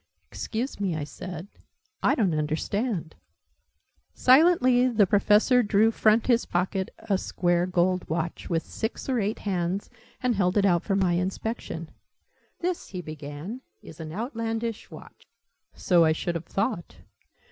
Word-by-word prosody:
"Excuse 240 +3 -4
me," 190 -5 -1
I 155 - -3
said. 175 +4 -7 0.5
"I - - +3
don't 195 -9 +1
understand." 160 +5 -2 1.0
Silently 255 -3 +5
the 225 -5 +4
Professor 210 +6 +4
drew 215 0 +3
front 220 0 +3
his 240 -2 +3
pocket 185 +2 -1
a 195 -3 -1
square 175 -1 0
gold 180 0 +1
watch, 165 +1 -3
with 165 -1 0
six 220 +1 -4
or 260 -3 +1
eight 210 +1 -1
hands, 185 0 -2 0.3
and 250 -1 +2
held 190 -2 +1
it 200 - +4
out 175 -3 +3
for 195 - -1
my 185 -3 +2
inspection. 180 -2 -3 0.7
"This," 355 0 -2
he 185 -2 -6
began, 155 - -7 0.2
"is 160 - -12
an 155 -1 -6
Outlandish 225 - -3
Watch - - -14 0.3
" - - -50
"So 175 -2 +4
I 160 -1 +4
should 170 +2 -2
have 170 -1 -5
thought." 195 -2 -2
195 Hz, 145 wpm, -26 LUFS, 170-225 Hz, 1.0 s, Silently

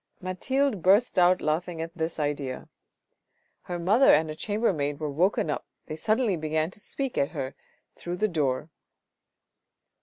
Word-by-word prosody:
Mathilde 215 +5 -1
burst 200 +4 +4
out 180 +1 +5
laughing 165 +2 -1
at 165 +2 -5
this 160 -1 -3
idea. 145 -3 -3 0.9
Her 175 - -5
mother 205 +10 +5
and 155 +1 0
a - - -6
chamber 210 +5 0
maid 145 -2 -2
were 155 -2 -3
woken 165 +1 +1
up, - - -4 0.2
they 155 - -6
suddenly 215 +4 +1
began 155 +1 -1
to - - -13
speak 270 +4 -4
to 140 - +1
her 130 -1 -5 0.4
through 175 0 -5
the 215 +4 +1
door. 150 -4 -1
170 Hz, 155 wpm, -27 LUFS, 155-200 Hz, 0.9 s, out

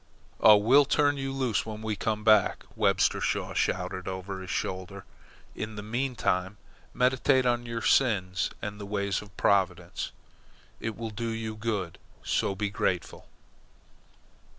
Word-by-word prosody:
"Oh, 105 -1 +8
we'll 130 +8 +5
turn 145 +1 +2
you 135 0 -3
loose 130 -6 0
when 110 0 -7
we 110 -1 -1
come 105 +1 -2
back," 110 -3 +4
Webster - - +2
Shaw - - -1
shouted 90 +1 -1
over 95 0 -5
his 95 - -9
shoulder. 95 -1 -4 0.5
"In 110 0 -5
the 105 - -6
meantime 110 -5 -1 0.3
meditate 130 +1 +2
on 120 -1 +1
your 115 -1 -4
sins 95 - +2
and 105 0 -5
the 100 - -6
ways 100 -1 -1
of 100 -3 -15
Providence. 95 -3 +1 0.7
It 110 -1 -4
will 115 -1 -5
do 115 +2 -3
you 110 -1 -4
good, 105 -6 -3 0.2
so 100 - 0
be 100 0 -2
grateful." 90 -3 -2
105 Hz, 145 wpm, -28 LUFS, 95-115 Hz, 0.7 s, Oh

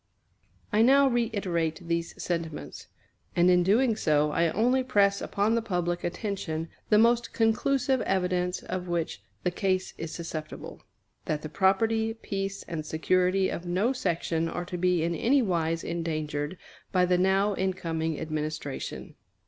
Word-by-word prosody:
I 215 - +4
now 275 +4 +6
reiterate 185 -9 -1
these 170 0 -2
sentiments; 165 -3 -4 0.5
and 175 +1 +5
in 180 0 +5
doing 220 +6 +3
so 150 -6 +2
I 165 +2 +2
only 245 +9 +2
press 200 -5 +3
upon 205 +3 0
the 230 - +2
public 175 -5 -2
attention 175 -4 -3 0.2
the 210 - +5
most 235 +2 +3
conclusive 250 +3 +2
evidence 180 -1 0
of 185 -1 -4
which 170 - -2 0.2
the 180 - +1
case 185 0 -1
is 165 -1 -4
susceptible, 160 -2 -7 0.4
that 150 -1 -2
the 155 - -5
property, 220 +5 +2
peace, 195 -3 -4
and 165 -3 -5
security 185 +4 +1
of 175 - -5
no 195 +9 +1
section 165 -7 -1
are 175 - -4
to 180 - -6
be 180 -2 +2
in 170 +1 0
anywise 170 - +1
endangered 155 -1 -3 0.3
by 180 -1 +3
the 180 0 +2
now 195 +2 +3
incoming 165 -4 -2
administration. 155 -2 -4
180 Hz, 140 wpm, -28 LUFS, 165-210 Hz, 0.5 s, now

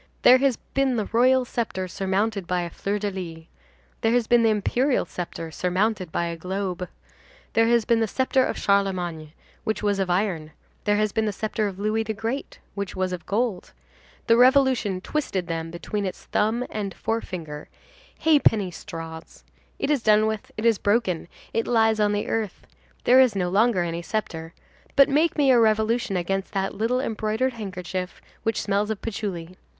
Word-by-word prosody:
There 255 +1 +8
has 270 -3 +2
been 270 -2 -1
the 215 -3 0
royal 255 +3 +4
sceptre 220 -6 -3
surmounted 195 +1 -1
by 180 0 0
a 170 - -5
fleur 200 +4 -2
de 205 0 -2
lys, 165 -4 -7 0.6
there 225 0 +2
has 245 -2 +3
been 240 +1 +4
the 225 - +4
imperial 245 +6 +1
sceptre 165 -2 -6
surmounted 185 +1 0
by 170 - 0
a 170 0 -3
globe, 180 +1 -4 0.6
there 225 0 +4
has 235 -2 +3
been 235 -2 +3
the 225 - +1
sceptre 260 +3 +2
of - - -2
Charlemagne, 180 -6 0 0.3
which 215 -1 -2
was 205 -1 +1
of 190 -2 0
iron, 175 -5 -1 0.3
there 205 -1 +3
has 215 0 +1
been 220 +2 0
the - - +1
sceptre 215 +1 -2
of 190 -2 -6
Louis 215 +2 0
the 220 0 -3
Great, 230 +6 -4 0.2
which 200 -1 -4
was 185 -1 -1
of 180 - -7
gold,—the 230 +1 -2
revolution 250 -6 +4
twisted 195 -9 -2
them 165 -1 -3
between 195 +4 -3
its 185 - -7
thumb 225 +4 0
and 205 -3 -4
forefinger, 170 -9 -4 0.5
ha'penny 230 - +4
straws; 165 -2 -9 0.3
it 275 - -1
is 285 -4 +2
done 215 -1 +4
with, 220 -1 -3
it 215 - -3
is 230 -3 +4
broken, 200 -6 +1 0.3
it 225 - 0
lies 225 -2 +3
on 210 -1 +3
the 205 0 -1
earth, 220 -4 -3 0.4
there 255 +2 +6
is 250 -5 +3
no 180 -2 0
longer 205 0 +3
any 170 0 -3
sceptre, 165 -4 -4 0.4
but 275 0 +6
make 305 +4 +2
me 280 -3 +5
a 245 - +6
revolution 220 -1 +2
against 195 +3 -2
that 195 -1 -1
little 230 +4 0
embroidered 225 +1 -1
handkerchief, 185 -4 -5 0.2
which 225 -1 -1
smells 205 +1 0
of 220 -2 -2
patchouli! 185 -6 -4
210 Hz, 175 wpm, -24 LUFS, 185-230 Hz, 0.6 s, There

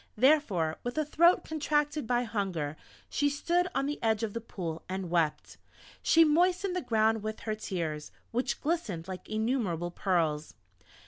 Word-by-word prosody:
Therefore, 215 - +3
with 245 +4 -4
a 310 - +2
throat 340 +4 +4
contracted 295 -3 0
by 245 +1 +2
hunger, 190 -10 -2 0.3
she 290 0 +1
stood 345 +5 +1
on 275 - +1
the 295 +1 -3
edge 220 -1 +1
of 215 -2 -2
the 230 - -3
Pool 170 -7 -5
and 185 -2 -4
wept; 165 -3 0 0.4
she 330 - +6
moistened 360 +4 +2
the 365 - 0
ground 220 -3 +2
with 215 +1 -5
her 215 - -2
tears, 165 -8 -4 0.2
which 250 +3 -1
glistened 235 - -2
like 185 -1 -7
innumerable 215 -7 -1
pearls. 165 -5 0
220 Hz, 155 wpm, -30 LUFS, 180-295 Hz, 0.4 s, she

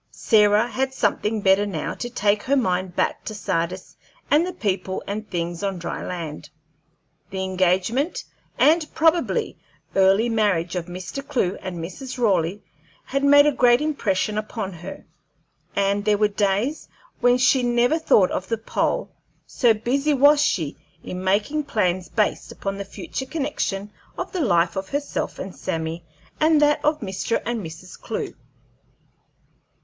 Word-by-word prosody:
Sarah 210 -1 +3
had 265 +2 -2
something 210 0 0
better 195 +1 +4
now 165 -7 -3
to 240 - -5
take 205 -3 +1
her 275 - +1
mind 185 -7 0
back - - 0
to 215 - -5
Sardis 185 -2 -3 0.4
and 315 +4 +4
the - - -3
people 190 - -2
and 215 +2 -5
things 170 -1 -3
on 195 -2 -2
dry 175 - -5
land. 155 -4 -6 0.8
The 190 0 -3
engagement 190 - 0 0.3
and 310 0 +3
probably 325 +1 +1 0.4
early 195 +4 +4
marriage 200 -7 +1
of 175 -1 -3
Mr. 185 +9 -6
Clewe 235 -10 0
and 185 -2 -5
Mrs. 190 +11 -6
Raleigh 195 -4 +1 0.4
had 275 +1 -2
made 285 +1 +7
a 295 - +4
great 245 -2 +4
impression 215 -9 0
upon 215 -2 -5
her, 170 0 -9 0.7
and 200 0 +1
there 210 0 +3
were 210 0 +3
days 205 +8 0 0.3
when 245 0 +4
she 255 +1 +4
never 245 +5 +2
thought 205 - +4
of 190 - -3
the 230 - 0
pole, 225 - -1 0.3
so 240 -3 +3
busy 275 +7 +1
was 285 +2 +6
she 160 - 0 0.3
in 180 0 -6
making 210 +11 +1
plans 185 -7 0
based 215 -2 0
upon 195 0 -4
the 200 - -4
future 265 +6 -6
connection 260 -9 -3 0.3
of - - -4
the 370 - -2
life 175 - +2
of 190 0 -4
herself 285 0 -3
and 185 - -7
Sammy 165 +1 -4 0.4
and 310 0 +4
that 295 0 +3
of 300 +1 +1
Mr. 195 +2 -1
and 235 -3 -2
Mrs. 165 +3 -10
Clewe. - - -4
210 Hz, 155 wpm, -23 LUFS, 185-260 Hz, 0.8 s, made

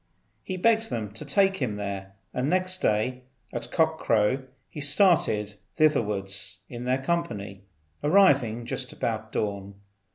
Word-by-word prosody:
He 185 - -5
begged 225 +3 +3
them 105 -3 -3
to 110 - -7
take 195 -1 +2
him 120 -7 -2
there, 100 -1 -5 0.2
and 125 +3 -1
next 185 +1 +1
day 115 +4 +1 0.3
at 120 0 -4
cock 160 0 +2
crow 115 +5 +1 0.2
he 150 - -8
started 145 - +3 0.2
thitherwards 100 -9 +1
in 120 0 -7
their 130 +1 +2
company, 105 - -3 0.4
arriving 140 - +4
just 125 +1 -4
about 110 -1 -3
dawn. 100 -1 -3
120 Hz, 135 wpm, -26 LUFS, 105-160 Hz, 0.4 s, arriving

